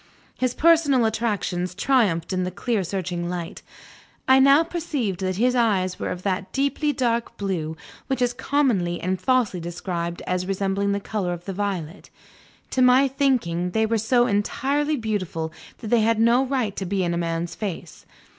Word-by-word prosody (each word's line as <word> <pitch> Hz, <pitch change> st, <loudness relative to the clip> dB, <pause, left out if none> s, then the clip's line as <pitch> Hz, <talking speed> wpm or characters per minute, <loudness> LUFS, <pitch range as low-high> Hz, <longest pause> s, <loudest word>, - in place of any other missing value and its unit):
His 255 Hz, -1 st, -1 dB
personal 305 Hz, -7 st, +4 dB
attractions 205 Hz, -5 st, -1 dB
triumphed 200 Hz, -8 st, +1 dB
in 185 Hz, 0 st, 0 dB
the 180 Hz, -, -1 dB
clear 200 Hz, +3 st, -1 dB
searching 175 Hz, -1 st, -3 dB
light. 175 Hz, -2 st, -5 dB, 0.7 s
I 260 Hz, 0 st, +6 dB
now 275 Hz, +4 st, +6 dB
perceived 300 Hz, -, -3 dB
that 185 Hz, -1 st, -1 dB
his 245 Hz, +5 st, +2 dB
eyes 200 Hz, -7 st, +1 dB
were -, -, -2 dB
of 180 Hz, -, -5 dB
that 190 Hz, -1 st, -2 dB
deeply 280 Hz, +2 st, 0 dB
dark 235 Hz, -4 st, -1 dB
blue, 165 Hz, -6 st, -3 dB, 0.3 s
which 265 Hz, -, -1 dB
is 245 Hz, -1 st, +1 dB
commonly 245 Hz, -10 st, 0 dB
and 185 Hz, +1 st, -2 dB
falsely 250 Hz, -8 st, +1 dB
described 170 Hz, 0 st, -4 dB
as 180 Hz, 0 st, -1 dB
resembling 195 Hz, +1 st, 0 dB
the 200 Hz, -, -1 dB
color 195 Hz, -3 st, -2 dB
of 175 Hz, 0 st, -8 dB
the 195 Hz, -, -4 dB
violet. 190 Hz, -3 st, -4 dB, 0.6 s
To 260 Hz, -, +1 dB
my 255 Hz, +2 st, +6 dB
thinking, 250 Hz, -11 st, 0 dB
they 220 Hz, 0 st, +2 dB
were 225 Hz, 0 st, 0 dB
so 240 Hz, +3 st, +3 dB
entirely 275 Hz, +8 st, 0 dB
beautiful 185 Hz, -8 st, -3 dB, 0.2 s
that 220 Hz, -, -7 dB
they 235 Hz, -1 st, +4 dB
had 225 Hz, 0 st, +2 dB
no 235 Hz, +3 st, +4 dB
right 250 Hz, -6 st, -1 dB
to 190 Hz, -, -3 dB
be 190 Hz, 0 st, 0 dB
in 175 Hz, -1 st, 0 dB
a -, -, -1 dB
man's 170 Hz, 0 st, -2 dB
face. 180 Hz, -6 st, -6 dB
205 Hz, 175 wpm, -23 LUFS, 180-250 Hz, 0.7 s, I